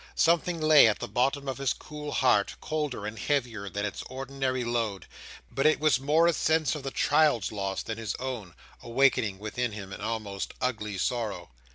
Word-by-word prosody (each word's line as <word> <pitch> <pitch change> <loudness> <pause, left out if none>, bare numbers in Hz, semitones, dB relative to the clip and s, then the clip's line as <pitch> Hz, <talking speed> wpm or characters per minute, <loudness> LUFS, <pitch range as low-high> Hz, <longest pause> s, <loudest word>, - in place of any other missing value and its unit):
Something 170 +1 +2
lay 155 -5 +7
at 105 - +2
the - - -5
bottom 135 +3 0
of 135 0 -3
his 135 -2 +1
cool 150 -1 -8
heart, 105 -6 +2
colder 150 -9 -3
and 110 +1 -5
heavier 120 -8 -1
than 100 +1 -3
its 100 -5 -4
ordinary 130 -1 -2
load; 115 -5 -2 0.5
but 135 - +2
it 155 - +3
was 150 -5 +3
more 150 +5 +3
a 170 - +4
sense 160 -3 +2
of 150 - -5
the 135 - -4
child's 145 -6 +2
loss 100 -2 -3
than 115 0 -5
his 110 -3 -3
own, 120 - -5 0.3
awakening 115 -5 +2
within 110 +3 -3
him 100 -2 -7
an - - -8
almost 105 -3 -4
angry 105 -5 -2
sorrow. 105 - -2
125 Hz, 185 wpm, -28 LUFS, 105-145 Hz, 0.5 s, lay